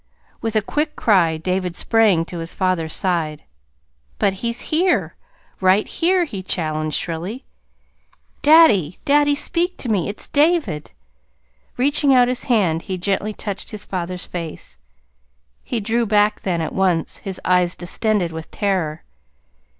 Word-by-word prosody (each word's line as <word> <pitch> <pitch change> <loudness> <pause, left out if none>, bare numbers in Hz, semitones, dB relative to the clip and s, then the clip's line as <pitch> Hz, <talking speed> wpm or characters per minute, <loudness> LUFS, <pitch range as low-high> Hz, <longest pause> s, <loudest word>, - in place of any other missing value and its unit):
With 225 -1 -3
a 215 - +2
quick 300 +7 -2
cry 175 -7 +3
David 180 +1 -2
sprang 210 -7 +3
to 175 0 -7
his 165 0 -6
father's 185 -4 -1
side. 160 -5 -1 0.7
"But 195 - +2
he's 235 0 -1
here 350 +3 +2 0.4
right 190 +2 +3
here," 355 +1 +1
he 200 - -6
challenged 155 -4 -2
shrilly. 180 - -4 1.0
"Daddy, 230 - +5
daddy, 290 0 +4
speak 350 +5 -1
to 245 - -3
me! 200 -5 0
It's 205 - -7
David!" 290 - +1 0.9
Reaching 280 +1 +3
out 245 -1 +5
his 250 0 -2
hand, 185 -9 +2
he 185 - -1
gently 200 +3 -1
touched 205 -1 -5
his 210 -1 -6
father's 180 -1 -4
face. 165 - -7 0.8
He 240 - -3
drew 225 +2 0
back 210 0 +2
then, 175 -3 -1
at 160 - -4
once, 180 -4 +1
his 195 -2 -5
eyes 180 -1 +2
distended 185 0 -1
with 160 0 -8
terror. 185 -7 -2
195 Hz, 140 wpm, -20 LUFS, 175-240 Hz, 1.0 s, Daddy